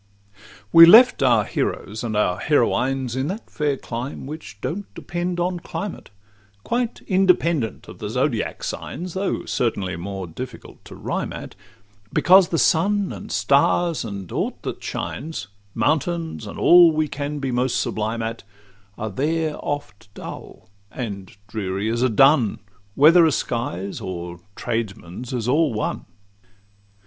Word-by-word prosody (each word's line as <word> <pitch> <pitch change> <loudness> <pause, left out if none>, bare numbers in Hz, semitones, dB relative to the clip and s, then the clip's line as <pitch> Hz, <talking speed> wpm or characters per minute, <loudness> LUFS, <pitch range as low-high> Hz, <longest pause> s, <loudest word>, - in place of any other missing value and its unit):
We 165 0 +11
left 240 +7 +8
our 120 -5 +4
heroes 105 +2 -3
and 110 -3 -2
our 90 -4 +1
heroines 130 -2 +1
In 130 +2 -1
that 200 +7 -5
fair 145 -2 -1
clime 125 +3 -6
which 135 -9 -8
don't 195 - -5
depend 175 0 -3
on 175 0 -1
climate, 205 +3 -6 0.5
Quite 240 -1 -2
independent 170 - +1
of - - -11
the - - -4
Zodiac's - - -1
signs, 180 0 -5
Though 190 +1 -2
certainly 100 -7 -1
more 95 +2 -5
difficult 115 +8 -9
to - - -11
rhyme - - -3
at, - - -8 0.6
Because 185 0 +6
the 165 - 0
sun, 195 +5 +2
and - - -9
stars, 140 - +2
and 100 -5 -7
aught - - -3
that - - -5
shines, 145 - -5 0.3
Mountains, 165 +2 -1
and - - -8
all 175 -1 +7
we 155 0 0
can 145 +1 -4
be 135 -2 -2
most 125 +1 0
sublime 110 +2 -2
at, 115 +1 -4 0.6
Are 110 0 -4
there 155 +6 -1
oft 145 -8 -5
dull - - -9 0.2
and 100 -5 -6
dreary 100 -1 -3
as 115 +1 -1
a 130 - +3
dun— 135 -1 +4 0.4
Whether 165 +5 +7
a - - +2
sky's 115 -7 -3
or 90 -3 -6 0.2
tradesman's 115 -2 -4
is 120 -3 -2
all 150 +3 +3
one. 105 - -3
130 Hz, 140 wpm, -22 LUFS, 110-165 Hz, 0.6 s, We